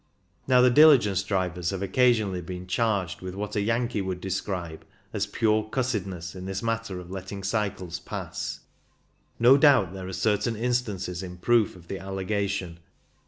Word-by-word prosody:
Now 125 -1 +5
the 125 0 +6
diligence 120 -9 +6
drivers 90 -3 -1
have 95 0 -3
occasionally 105 -3 +2
been 90 +1 -7
charged 100 -3 -1
with 95 0 -6
what 105 +1 -4
a 105 - +1
Yankee 115 +1 0
would 95 -1 -3
describe 90 -3 -4 0.3
as - - -1
"pure 110 -1 +1
cussedness" 95 -10 -2
in 95 0 -8
this 95 +2 -4
matter 115 -4 -2
of 90 0 -10
letting 95 +1 -6
cycles 95 -4 -2
pass. - - -5 0.8
No 125 +4 +7
doubt 135 - +5
there 95 -1 -7
are 95 - -6
certain 105 +3 0
instances 105 -7 -2
in 90 -1 -8
proof 115 +2 +2
of 85 -2 -15
the 95 - -5
allegation. 95 -2 -3
100 Hz, 160 wpm, -26 LUFS, 90-115 Hz, 0.8 s, No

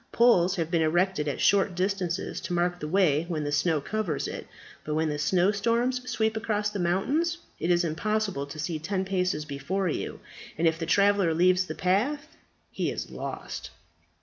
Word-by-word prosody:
Poles 195 -6 +4
have 165 -2 -2
been 170 -2 +2
erected 170 0 +1
at 145 - -2
short 195 -2 +3
distances 185 -1 -2
to 180 0 -4
mark 175 0 0
the 150 - -4
way 165 -3 +3
when 160 -4 -2
the 145 - -2
snow 150 +2 +2
covers 180 -1 -2
it. - - -6 0.4
But 150 - -3
when 160 0 +1
the 150 0 -3
snowstorms 230 +9 +1
sweep 220 -1 0
across 210 -2 -1
the 205 - -4
mountains, 275 - +1 0.2
it 170 - -1
is 175 0 +4
impossible 195 -2 -1
to 145 - -9
see 160 0 -3
ten 190 +4 -2
paces 180 -5 -1
before 180 +6 -2
you, - - -4 0.4
and 165 +1 +3
if 160 0 +1
the 165 - -3
traveller 200 -3 +3
leaves 185 +2 +3
the - - -5
path 270 - 0 0.4
he - - -1
is - - -5
lost." - - -6
180 Hz, 180 wpm, -27 LUFS, 160-205 Hz, 0.4 s, Poles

